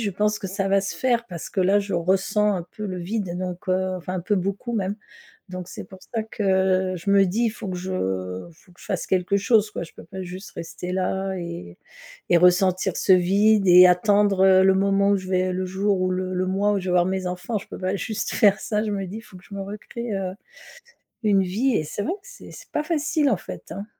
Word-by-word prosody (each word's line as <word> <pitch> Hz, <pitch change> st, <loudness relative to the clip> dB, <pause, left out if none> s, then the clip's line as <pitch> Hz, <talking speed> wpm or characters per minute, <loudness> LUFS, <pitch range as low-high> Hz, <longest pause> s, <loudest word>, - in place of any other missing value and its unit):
je 210 Hz, -3 st, -1 dB
pense 210 Hz, +2 st, 0 dB
que -, -, -5 dB
ça 195 Hz, +1 st, -2 dB
va 195 Hz, 0 st, +3 dB
se 195 Hz, -, -4 dB
faire, 240 Hz, -2 st, +1 dB
parce 175 Hz, -6 st, -7 dB
que 190 Hz, -, -1 dB
là, 195 Hz, +3 st, +4 dB
je 200 Hz, -1 st, -3 dB
ressens 195 Hz, +4 st, +1 dB
un 175 Hz, -2 st, -4 dB
peu 215 Hz, -1 st, -4 dB
le 185 Hz, -1 st, -4 dB
vide 185 Hz, -1 st, -3 dB
donc 180 Hz, 0 st, -5 dB
heu 185 Hz, 0 st, 0 dB
enfin, 180 Hz, +1 st, -6 dB
un 185 Hz, -, -2 dB
peu 205 Hz, +5 st, 0 dB
beaucoup 195 Hz, +6 st, -3 dB
même, 200 Hz, -3 st, -1 dB, 0.6 s
donc 180 Hz, -1 st, -6 dB
c'est -, -, -8 dB
pour 190 Hz, 0 st, -14 dB
ça 225 Hz, -2 st, 0 dB
que 190 Hz, -3 st, +1 dB
je 175 Hz, +4 st, -5 dB
me 200 Hz, 0 st, +6 dB
dis 225 Hz, +6 st, +1 dB
«faut 220 Hz, -2 st, -8 dB
que 180 Hz, -, -4 dB
je 185 Hz, +1 st, -5 dB, 0.6 s
faut 180 Hz, -, -23 dB
que 175 Hz, -, -20 dB
je -, -, -12 dB
fasse 190 Hz, -, -2 dB
quelque 185 Hz, +1 st, +1 dB
chose 210 Hz, +1 st, +3 dB
quoi, 175 Hz, -, -4 dB
je 165 Hz, -, -11 dB
peux -, -, -12 dB
pas 190 Hz, +3 st, -8 dB
juste 185 Hz, +2 st, -8 dB
rester 180 Hz, +2 st, -6 dB
là 190 Hz, +1 st, -1 dB
et 170 Hz, -, -7 dB, 0.5 s
et -, -, +5 dB
ressentir 180 Hz, +1 st, +3 dB
ce 190 Hz, -, +3 dB
vide 200 Hz, +3 st, +3 dB
et 180 Hz, +1 st, +9 dB
attendre, 200 Hz, +1 st, +3 dB
heu, 190 Hz, -1 st, +6 dB
le 190 Hz, -, +5 dB
moment 200 Hz, +1 st, +2 dB
où 200 Hz, -, +4 dB
je 185 Hz, -1 st, -6 dB
vais 185 Hz, 0 st, +1 dB
le 185 Hz, +1 st, -2 dB
jour 195 Hz, +1 st, 0 dB
ou 185 Hz, 0 st, +1 dB
le 185 Hz, 0 st, -2 dB
le 185 Hz, 0 st, 0 dB
mois 195 Hz, +2 st, +1 dB
où 200 Hz, -, +1 dB
je -, -, -9 dB
vais 180 Hz, -, 0 dB
voir 175 Hz, 0 st, +4 dB
mes 190 Hz, -1 st, -2 dB
enfants. 180 Hz, +5 st, -3 dB
Je 205 Hz, -, -12 dB
peux -, -, -8 dB
pas 185 Hz, +1 st, -1 dB
juste 215 Hz, +3 st, -3 dB
faire 205 Hz, -2 st, +4 dB
ça», 215 Hz, -2 st, -1 dB
je 215 Hz, -, -2 dB
me 195 Hz, -2 st, -2 dB
dis: 210 Hz, +5 st, -7 dB
«Faut 210 Hz, -, -15 dB
que 180 Hz, -, -19 dB
je 200 Hz, -, -10 dB
me 195 Hz, -, -4 dB
recrée, 215 Hz, +3 st, -6 dB
heu, 185 Hz, -1 st, -3 dB, 0.9 s
une 205 Hz, -3 st, +3 dB
vie» 225 Hz, +8 st, 0 dB
et 155 Hz, -, 0 dB
c'est 180 Hz, +7 st, -4 dB
vrai 335 Hz, -, -1 dB
que 405 Hz, -, -5 dB
c'est -, -, -12 dB
c'est -, -, -13 dB
pas 300 Hz, -, -1 dB
facile, 305 Hz, -2 st, +1 dB
en 215 Hz, -, +2 dB
fait, -, -, -9 dB
hein. 200 Hz, +4 st, -6 dB
190 Hz, 250 wpm, -23 LUFS, 185-205 Hz, 0.9 s, et